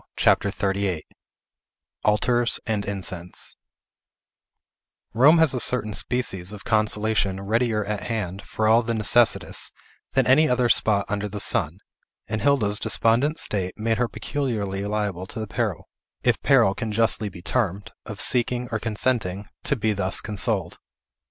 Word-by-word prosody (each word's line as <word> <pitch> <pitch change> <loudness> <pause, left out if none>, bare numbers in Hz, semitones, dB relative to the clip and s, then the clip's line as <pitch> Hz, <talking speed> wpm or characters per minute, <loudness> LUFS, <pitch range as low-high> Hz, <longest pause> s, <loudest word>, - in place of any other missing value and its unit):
CHAPTER 100 - +2
XXXVIII 100 -4 -2 1.0
ALTARS 120 +3 +2
AND 105 -2 -2
INCENSE 90 -3 -4 1.6
Rome 140 +8 +6
has 160 -4 +4
a 125 - -2
certain 115 -4 +5
species 95 -2 -2
of 105 -1 -9
consolation 105 -2 0
readier 110 +1 0
at 105 0 -3
hand, 100 -5 -4
for 110 +2 -2
all 115 +2 +5
the 115 0 -3
necessitous, 115 +2 +2 0.4
than 135 -1 +2
any 155 +5 +4
other 125 -1 +1
spot 100 -3 +3
under 100 0 -3
the 105 +1 -6
sun; 85 0 +2 0.5
and 110 0 -3
Hilda's 110 -8 +2
despondent 130 +8 +2
state 95 - -1
made 110 +1 -1
her 125 - +1
peculiarly 110 -10 -3
liable 100 -3 -3
to 110 - -6
the 110 - -3
peril, 100 - -3 0.4
if - - +1
peril 95 - +4
it 100 - -8
can 115 -3 -3
justly 110 -1 +1
be 90 -2 -13
termed, 100 -4 -2 0.2
of 105 -3 -8
seeking, 125 0 +1
or 110 - -1
consenting, 105 -3 -2 0.2
to - - +2
be 110 -3 0
thus 100 -1 -1
consoled. 100 -4 -2
105 Hz, 145 wpm, -23 LUFS, 100-120 Hz, 1.6 s, Rome